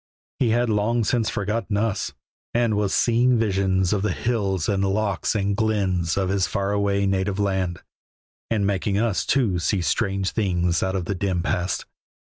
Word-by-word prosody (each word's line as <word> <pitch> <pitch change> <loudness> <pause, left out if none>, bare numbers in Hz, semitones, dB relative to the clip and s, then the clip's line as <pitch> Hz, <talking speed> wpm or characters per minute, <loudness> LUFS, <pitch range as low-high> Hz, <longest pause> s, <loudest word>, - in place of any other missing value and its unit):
He 125 - +2
had 120 +2 +2
long 110 +2 +1
since 115 0 +1
forgotten 105 0 -2
us, 105 -1 -1 0.4
and 120 -3 +2
was 105 -2 0
seeing 120 +1 +3
visions 95 -3 +1
of 100 - 0
the 105 - 0
hills 100 -7 -1
and 100 -1 +1
lochs 100 +1 0
and 100 -1 0
glens 95 -6 0
of 95 -2 0
his 95 -1 +1
far 100 -1 -1
away 100 -1 +1
native 95 0 0
land, 95 -4 -1 0.7
and 105 -3 +1
making 100 0 0
us, 110 -2 0
too, 110 -10 +2
see 85 +3 0
strange 95 +1 0
things 90 -5 0
out 95 0 -1
of 90 -2 -2
the 100 - -1
dim 90 -2 -1
past. 90 +1 -1
100 Hz, 170 wpm, -23 LUFS, 95-110 Hz, 0.7 s, seeing